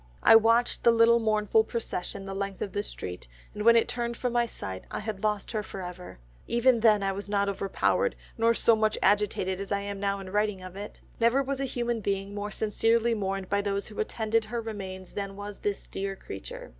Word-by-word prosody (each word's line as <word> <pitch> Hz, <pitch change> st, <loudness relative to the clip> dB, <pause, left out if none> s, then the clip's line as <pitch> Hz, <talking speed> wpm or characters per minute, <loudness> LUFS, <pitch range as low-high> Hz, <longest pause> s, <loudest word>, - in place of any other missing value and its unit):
I -, -, +8 dB
watched 230 Hz, +2 st, +4 dB
the -, -, +6 dB
little 230 Hz, 0 st, +5 dB
mournful 215 Hz, -1 st, +3 dB
procession 200 Hz, -4 st, -4 dB
the 195 Hz, -, -5 dB
length 195 Hz, 0 st, -3 dB
of 195 Hz, -, -5 dB
the 205 Hz, -, -1 dB
street, 90 Hz, -, -7 dB, 0.3 s
and 210 Hz, -, -6 dB
when 235 Hz, +1 st, +7 dB
it 230 Hz, -, +4 dB
turned 235 Hz, -1 st, -2 dB
from 250 Hz, -2 st, -2 dB
my 240 Hz, -1 st, +2 dB
sight, 95 Hz, -, -6 dB
and -, -, -26 dB
I -, -, -2 dB
had 210 Hz, -2 st, -5 dB
lost 210 Hz, -2 st, -1 dB
her 215 Hz, -, -1 dB
for 195 Hz, -2 st, -7 dB
ever, 180 Hz, -, -8 dB, 0.3 s
even 235 Hz, 0 st, +3 dB
then 215 Hz, -3 st, +4 dB
I 195 Hz, -, +1 dB
was 200 Hz, +1 st, -6 dB
not 200 Hz, -1 st, +1 dB
over 195 Hz, 0 st, -3 dB
powered, 485 Hz, -, +1 dB, 0.2 s
nor 230 Hz, 0 st, +3 dB
so 230 Hz, -, +5 dB
much 215 Hz, 0 st, +1 dB
agitated 200 Hz, -2 st, +2 dB
as 200 Hz, +1 st, -6 dB
I 200 Hz, 0 st, +1 dB
am 200 Hz, 0 st, -5 dB
now 200 Hz, 0 st, 0 dB
in 190 Hz, -1 st, -8 dB
writing 205 Hz, -2 st, 0 dB
of 185 Hz, 0 st, -9 dB
it. 205 Hz, +1 st, -8 dB, 0.2 s
Never 235 Hz, +4 st, +3 dB
was 270 Hz, 0 st, -3 dB
a 275 Hz, -, 0 dB
human 240 Hz, -3 st, -2 dB
being 195 Hz, 0 st, -2 dB
more 205 Hz, 0 st, -4 dB
sincerely 225 Hz, +2 st, +1 dB
mourned 195 Hz, -3 st, -2 dB
by 200 Hz, +1 st, +1 dB
those 200 Hz, 0 st, -2 dB
who 210 Hz, -, -9 dB
attended 220 Hz, +1 st, 0 dB
her 235 Hz, +2 st, -3 dB
remains 190 Hz, -5 st, -7 dB
than 200 Hz, -1 st, -4 dB
was 205 Hz, 0 st, -7 dB
this 205 Hz, -1 st, -2 dB
dear 195 Hz, 0 st, -4 dB
creature. 95 Hz, -, -8 dB
210 Hz, 225 wpm, -28 LUFS, 195-230 Hz, 0.3 s, I